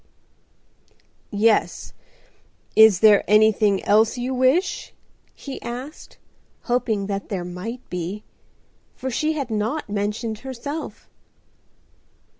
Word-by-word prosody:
"Yes. 215 +1 +1 0.8
Is 220 -4 +7
there 215 -2 +6
anything 210 -1 +3
else 220 +3 +3
you 250 +2 -2
wish?" 260 +9 +1 0.4
he 275 -2 -8
asked, 255 +6 -8 0.4
hoping 235 -5 -1
that 200 0 -4
there 185 -4 -3
might 200 +8 -7
be, 180 +4 -5 0.7
for 260 - -5
she 310 +6 0
had 275 -6 -4
not 220 +6 -2
mentioned 210 +2 -2
herself. 265 +5 -7
220 Hz, 95 wpm, -22 LUFS, 205-255 Hz, 0.8 s, Is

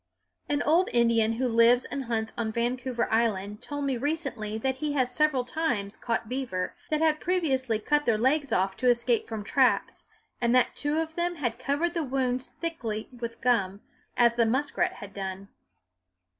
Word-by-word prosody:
An 290 0 +1
old 335 +5 +3
Indian 230 -2 +3
who 255 +3 0
lives 235 +1 +5
and 275 -2 -4
hunts 220 -1 -2
on 225 -2 -2
Vancouver 240 +1 -1
Island 210 -3 0
told 290 -1 -4
me 270 -2 0
recently 245 -7 -3
that 265 +3 -1
he 300 +1 -2
has 255 -3 0
several 275 -3 +2
times 240 -9 -2
caught 230 -1 -2
beaver 240 -8 -3 0.2
that 310 0 0
had 310 -1 +3
previously 270 -10 0
cut 295 +7 0
their 225 -2 +3
legs 275 +4 +1
off 190 -1 +1
to 255 - +2
escape 235 -1 +2
from 220 -2 -5
traps, 260 +4 +1 0.3
and 240 +1 +3
that 255 - +3
two 290 +1 +1
of 320 0 -2
them 350 +1 -1
had 240 -6 -3
covered 290 +6 0
the 335 - -1
wounds 255 -2 -1
thickly 235 -11 -4
with 235 -2 -7
gum, 200 -5 +1 0.4
as 235 -1 +5
the 235 -1 +2
muskrat 265 +6 0
had 200 -1 -10
done. 195 0 -6
245 Hz, 175 wpm, -27 LUFS, 225-285 Hz, 0.4 s, lives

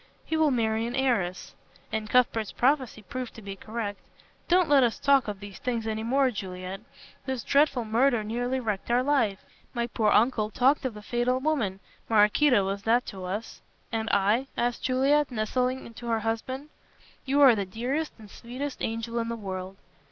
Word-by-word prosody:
He 320 - -2
will 315 -1 +4
marry 225 -3 0
an 240 - -4
heiress 225 -10 0 0.2
" 180 - -29
And 215 -1 -2
Cuthbert's 230 -3 +2
prophecy 260 -4 +1
proved 255 +5 -6
to 225 - -10
be 195 0 -6
correct 215 0 -5 0.5
"Don't 360 -1 +4
let 285 -2 +5
us 240 -3 +2
talk 275 -3 +3
of 205 -2 -4
these 200 -1 -10
things 235 -3 -2
any 220 0 -2
more, 260 +3 +2
Juliet. 185 -2 -6 0.5
This 260 -4 -2
dreadful 280 -4 +2
murder 235 +1 +2
nearly 245 +4 -1
wrecked 215 -5 -3
our 245 +1 +3
life. 240 -9 +1 0.3
My 235 0 0
poor 225 -2 0
uncle 215 0 +3
talked 260 +6 +2
of 235 -5 -3
a 210 - -10
fatal 245 +3 0
woman. 235 -10 -1 0.3
Maraquito 215 +1 +4
was 195 +1 -2
that 235 +4 +2
to 190 -3 -7
us." 205 +5 -5 0.3
"And 225 0 -2
I?" 210 +7 +2
asked 240 0 0
Juliet, 275 +3 +2
nestling 250 +2 -2
to 240 +1 -9
her 225 -1 0
husband. 255 +6 -3 0.6
"You 275 +2 +1
are 270 -4 +9
the 200 -3 -1
dearest 255 +10 -2
and 220 -2 -13
sweetest 255 +7 -6
angel 230 +1 -2
in 230 0 -2
the 235 - -2
world." 190 -3 -6
235 Hz, 180 wpm, -27 LUFS, 210-260 Hz, 0.6 s, are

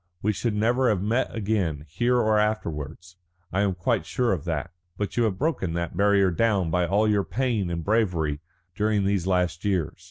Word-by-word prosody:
We 105 +1 +2
should 110 +2 -2
never 120 +4 +2
have 100 -4 0
met 115 +5 +1
again 95 -9 -1
here 120 +11 +1
or 110 -3 +3
afterwards. 85 -5 -3 0.4
I 95 - +2
am 100 -3 +1
quite 85 - 0
sure 125 -4 +1
of 85 -4 -4
that. 80 -5 -3 0.3
But 105 - -3
you 120 - +2
have 100 -4 -1
broken 135 - -1
the 85 -1 -2
barrier 100 0 +3
down 100 -3 +1
by 90 0 +1
all 105 +5 +2
your 105 -2 +2
pain 115 -7 -1
and 85 -1 -3
bravery 90 -9 0 0.3
during 105 +1 +1
these 95 -2 0
last 90 -3 0
years. 95 -7 -1
100 Hz, 190 wpm, -25 LUFS, 85-110 Hz, 0.4 s, or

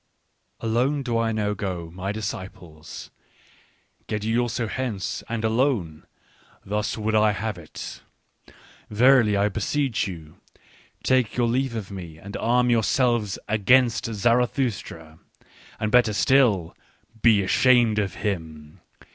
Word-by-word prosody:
" - - -47
Alone 125 +6 0
do 120 -3 -2
I 115 -1 0
now 105 -2 -1
go, 90 -5 -5
my 95 +2 -4
disciples! 95 -8 -7 1.0
Get 105 -1 -3
ye 110 +1 0
also 120 0 0
hence, 110 -4 -4
and 115 -1 -2
alone! 110 - 0 0.6
Thus 105 +2 -2
would 110 0 -1
I 105 -1 +4
have 105 -3 -4
it. 80 - -9 0.4
" - - -24
Verily, 115 -1 +4
I 100 +1 +3
beseech 110 +3 -1
you: 80 -5 -9 0.7
take 130 -4 +1
your 120 -1 +2
leave 125 +1 0
of 105 -3 -5
me 85 -5 -8
and 100 +5 -10
arm 125 +1 +2
yourselves 120 -2 +1
against 120 +5 +3
Zarathustra! 115 - -1 0.6
And 110 -1 -1
better 120 -3 +4
still, 105 -8 +2 0.5
be 110 -4 +5
ashamed 120 +1 +4
of 100 -3 -2
him 80 -6 -5
110 Hz, 130 wpm, -24 LUFS, 95-120 Hz, 1.0 s, be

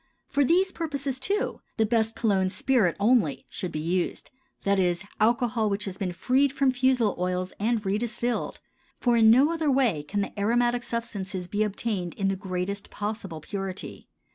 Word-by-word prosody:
For 285 - +1
these 370 +7 +3
purposes, 280 -6 -3
too, 405 - -1 0.2
the 220 - +3
best 225 0 +1
cologne 195 -5 +2
spirit 215 -3 +2
only 205 - +2
should 180 - -4
be 155 - -3
used, 170 +3 -2 0.3
that 200 0 +2
is, 175 -1 +1 0.2
alcohol 230 0 +2
which 205 +2 -1
has 195 0 -6
been 190 -3 -1
freed 255 +10 +2
from 275 -1 +2
fusel 255 -4 +2
oil 180 0 -1
and 220 0 0
redistilled, 235 +4 -1 0.4
for 240 -1 +2
in 225 -1 +6
no 270 +8 +5
other 320 -3 0
way 255 - +2
can 200 +8 -2
the 200 - -5
aromatic 240 +3 +2
substances 200 -6 -4
be 205 +4 -2
obtained 205 -4 -2
in 195 -1 0
the 195 - 0
greatest 190 +1 -4
possible 205 -6 -5
purity. 195 +2 -6
215 Hz, 165 wpm, -26 LUFS, 190-245 Hz, 0.4 s, in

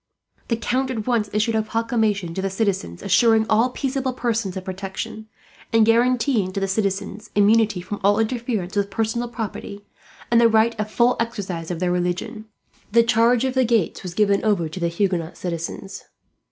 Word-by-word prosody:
The 230 - 0
Count 255 +3 -1
at 225 -5 -3
once 230 -4 0
issued 215 +2 +1
a 220 - +2
proclamation 220 -5 -1
to 190 - -3
the 195 - -1
citizens, 190 - -2
assuring 225 +2 +4
all 225 +4 +3
peaceable 265 0 -2
persons 230 -6 -2
of 185 - -6
protection; 195 +3 -6 0.4
and 225 -1 +5
guaranteeing 230 -3 +2
to 195 - -2
the 195 - -1
citizens 195 +1 -2
immunity 210 -1 +3
from 200 +3 -6
all 205 +1 +4
interference 225 -4 -2
with 200 -1 0
personal 225 +3 -1
property, 210 -3 -6 0.5
and 235 0 +5
the 230 - +6
right 225 +1 +3
of 210 0 -2
full 240 +3 +2
exercise 195 -8 -3
of 175 -2 -3
their 180 0 0
religion. 180 +5 -2 0.5
The 230 +2 +5
charge 230 +1 +3
of 260 - -1
the 260 0 +3
gates 230 -6 +1
was 180 -2 -7
given 200 -1 +2
over 200 -7 +1
to 160 +4 -7
the 170 - 0
Huguenot 170 -1 -1
citizens. 175 +2 -5
215 Hz, 180 wpm, -22 LUFS, 195-230 Hz, 0.5 s, the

